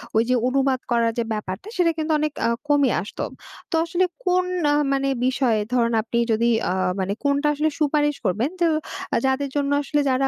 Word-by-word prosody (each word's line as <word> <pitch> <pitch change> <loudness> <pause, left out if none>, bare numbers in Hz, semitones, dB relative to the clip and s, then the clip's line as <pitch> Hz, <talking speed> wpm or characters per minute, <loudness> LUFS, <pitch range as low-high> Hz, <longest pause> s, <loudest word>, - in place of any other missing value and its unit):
ওই 225 - +5
যে 255 - +4
অনুবাদ 265 0 +1
করার 230 -1 +3
যে 235 - +2
ব্যাপারটা 210 - -5
সেটা 340 -2 +3
কিন্তু 315 0 -1
অনেক 300 -1 -1
আ - - +2 0.2
কমে 285 -3 +3
আসত। 205 - -10 0.5
তো - - +1
আসলে 350 +2 +1 0.2
কোন 365 0 +2 0.3
আ - - +3 0.2
মানে 275 0 +1 0.2
বিষয়ে 255 -4 +2
ধরুন 235 -1 +2
আপনি 230 +1 -3
যদি 230 +2 +2 0.2
আ - - +1 0.3
মানে 190 +1 -1
কোনটা 285 +1 +2
আসলে 300 +2 +1
সুপারিশ 295 -1 +2
করবেন 220 +10 +1
যে 340 - +5 0.6
যাদের 265 +1 0
জন্য 285 0 0
আসলে 290 +1 0
যারা 270 +1 +2
275 Hz, 185 wpm, -23 LUFS, 235-295 Hz, 0.6 s, ওই